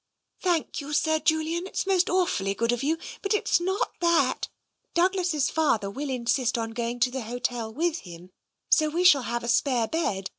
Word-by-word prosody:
" -, -, -53 dB
Thank 345 Hz, -4 st, 0 dB
you. 290 Hz, +1 st, -7 dB
Sir 315 Hz, +1 st, +2 dB
Julian, 320 Hz, +3 st, 0 dB
it's -, -, -3 dB
most 375 Hz, -2 st, +2 dB
awfully 330 Hz, -, 0 dB
good 230 Hz, +2 st, +1 dB
of 240 Hz, -, -1 dB
you. 310 Hz, +4 st, 0 dB, 0.2 s
But 395 Hz, +1 st, +1 dB
it's 415 Hz, -, +2 dB
not 380 Hz, +3 st, -1 dB
that. 340 Hz, -1 st, +2 dB, 0.5 s
Douglas' 350 Hz, -5 st, +1 dB
father 235 Hz, -11 st, +1 dB
will 280 Hz, +6 st, -5 dB
insist 245 Hz, -1 st, 0 dB
on 225 Hz, -1 st, -3 dB
going 235 Hz, +1 st, -3 dB
to 250 Hz, +1 st, +3 dB
the 265 Hz, 0 st, -4 dB
hotel, 240 Hz, 0 st, -3 dB
with 330 Hz, +6 st, -1 dB
him, 175 Hz, 0 st, -12 dB, 0.4 s
so 310 Hz, -1 st, +4 dB
we 340 Hz, +4 st, -1 dB
shall 300 Hz, -7 st, +7 dB
have 240 Hz, -1 st, -3 dB
a -, -, -4 dB
spare 240 Hz, -1 st, +2 dB
bed. 200 Hz, -, -2 dB
290 Hz, 190 wpm, -26 LUFS, 235-340 Hz, 0.5 s, shall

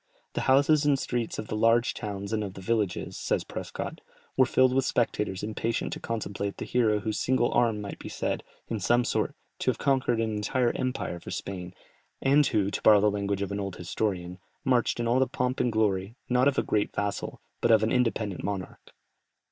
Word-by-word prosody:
"The -, -, -1 dB
houses 145 Hz, +3 st, +5 dB
and 145 Hz, -1 st, +3 dB
streets 120 Hz, -3 st, -2 dB
of 105 Hz, -, -5 dB
the -, -, -3 dB
large 115 Hz, +2 st, +3 dB
towns 100 Hz, 0 st, -5 dB
and 110 Hz, -1 st, 0 dB
of 95 Hz, -2 st, -6 dB
the -, -, -8 dB
villages," 105 Hz, -2 st, -1 dB
says -, -, 0 dB
Prescott, -, -, -6 dB, 0.3 s
"were 130 Hz, -1 st, +5 dB
filled 130 Hz, -1 st, +4 dB
with 135 Hz, 0 st, +3 dB
spectators 105 Hz, -6 st, 0 dB
impatient 110 Hz, +2 st, -2 dB
to -, -, -5 dB
contemplate 100 Hz, -3 st, -3 dB
the -, -, -5 dB
hero 110 Hz, -4 st, +2 dB
whose 110 Hz, +2 st, -2 dB
single 125 Hz, -2 st, +2 dB
arm 115 Hz, -3 st, +2 dB
might 100 Hz, -, -7 dB
be -, -, -7 dB
said, -, -, -2 dB, 0.3 s
in 115 Hz, -, -3 dB
some 120 Hz, +5 st, +3 dB
sort, -, -, 0 dB, 0.2 s
to -, -, +1 dB
have -, -, 0 dB
conquered 130 Hz, -4 st, +1 dB
an 110 Hz, -2 st, -1 dB, 0.3 s
empire 130 Hz, -8 st, -2 dB
for -, -, -10 dB
Spain, 90 Hz, -2 st, -5 dB, 0.4 s
and 140 Hz, +1 st, +4 dB
who, 100 Hz, -1 st, +1 dB
to -, -, -3 dB
borrow 105 Hz, -1 st, +7 dB
the 105 Hz, +1 st, +3 dB
language 100 Hz, -1 st, -1 dB
of 100 Hz, -, -4 dB
an 100 Hz, -, -2 dB
old 100 Hz, -2 st, -4 dB
historian, 90 Hz, 0 st, -3 dB, 0.3 s
marched 120 Hz, -2 st, +2 dB
in 120 Hz, -, 0 dB
all 120 Hz, +2 st, +3 dB
the 130 Hz, -, +3 dB
pomp 125 Hz, 0 st, -1 dB
and 120 Hz, -, +2 dB
glory, 105 Hz, -1 st, 0 dB
not 125 Hz, +2 st, +3 dB
of 140 Hz, -, +2 dB
a -, -, +3 dB
great 105 Hz, -1 st, 0 dB
vassal, 100 Hz, 0 st, -3 dB, 0.2 s
but 120 Hz, -, +2 dB
of 110 Hz, -1 st, +6 dB
an 110 Hz, -, +1 dB
independent 115 Hz, -6 st, 0 dB
monarch." 100 Hz, -2 st, -5 dB
110 Hz, 205 wpm, -28 LUFS, 100-125 Hz, 0.4 s, borrow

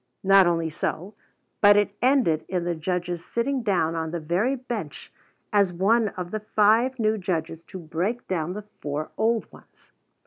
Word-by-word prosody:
Not 195 Hz, -1 st, +6 dB
only 165 Hz, -2 st, 0 dB
so, 180 Hz, +5 st, -3 dB, 0.5 s
but 205 Hz, 0 st, +7 dB
it 205 Hz, 0 st, +1 dB
ended 245 Hz, -, +3 dB
in 180 Hz, -2 st, -1 dB
the 175 Hz, 0 st, -1 dB
Judge's 175 Hz, +1 st, -3 dB
sitting 255 Hz, +6 st, -1 dB
down 185 Hz, -7 st, +1 dB
on 160 Hz, -1 st, -2 dB
the 170 Hz, +1 st, -3 dB
very 180 Hz, -, 0 dB
bench 230 Hz, -, -6 dB, 0.4 s
as 200 Hz, -3 st, +4 dB
one 210 Hz, +6 st, +2 dB
of 180 Hz, -1 st, -5 dB
the 215 Hz, -, -2 dB
five 220 Hz, +4 st, +2 dB
new 215 Hz, -2 st, +1 dB
Judges 165 Hz, -3 st, -3 dB
to 190 Hz, -, -9 dB
break 180 Hz, +8 st, -3 dB
down 175 Hz, -2 st, -2 dB
the 210 Hz, +2 st, -6 dB, 0.2 s
four 150 Hz, +1 st, -4 dB
old 225 Hz, 0 st, 0 dB
ones. -, -, -20 dB
190 Hz, 170 wpm, -25 LUFS, 170-220 Hz, 0.5 s, but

